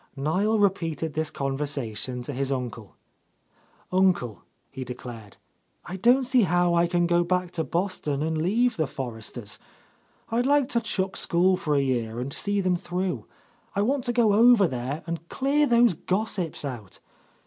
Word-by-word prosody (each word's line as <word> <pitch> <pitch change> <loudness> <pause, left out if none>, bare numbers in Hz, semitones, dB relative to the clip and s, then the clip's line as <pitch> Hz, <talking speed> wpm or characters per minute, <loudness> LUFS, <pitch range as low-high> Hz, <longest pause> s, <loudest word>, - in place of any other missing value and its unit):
Niel 185 +10 +1
repeated 165 -6 0
this 155 0 -1
conversation 135 -4 -3
to 140 - -5
his 135 +1 -2
uncle. 120 -5 -5 1.0
"Uncle," 175 - +2 0.3
he 130 - -6
declared, 120 -4 -9 0.5
"I 185 - -6
don't 245 +7 +4
see 255 0 +3
how 175 -2 +2
I 170 0 +3
can 175 0 +1
go 175 0 +3
back 180 0 -1
to 165 -2 -2
Boston 165 -6 -2
and 160 0 -1
leave 235 +8 +1
the 155 -3 +1
Forresters. 115 -4 -6 0.7
I'd 240 +3 +1
like 285 -2 +3
to 235 -4 +1
chuck 195 -4 -2
school 180 +2 +2
for 150 -4 -1
a 140 - +3
year, 120 -3 -1
and 130 +3 -4
see 205 -1 -1
them 185 -1 +1
through. 180 +1 -3 0.5
I 200 - +2
want 265 +3 0
to 240 - 0
go 230 -3 +3
over 225 -2 +6
there 130 +3 -4
and 170 0 -5
clear 285 +2 +2
those 235 -4 +5
gossips 185 -3 -2
out. 120 -8 -7
175 Hz, 160 wpm, -26 LUFS, 135-205 Hz, 1.0 s, over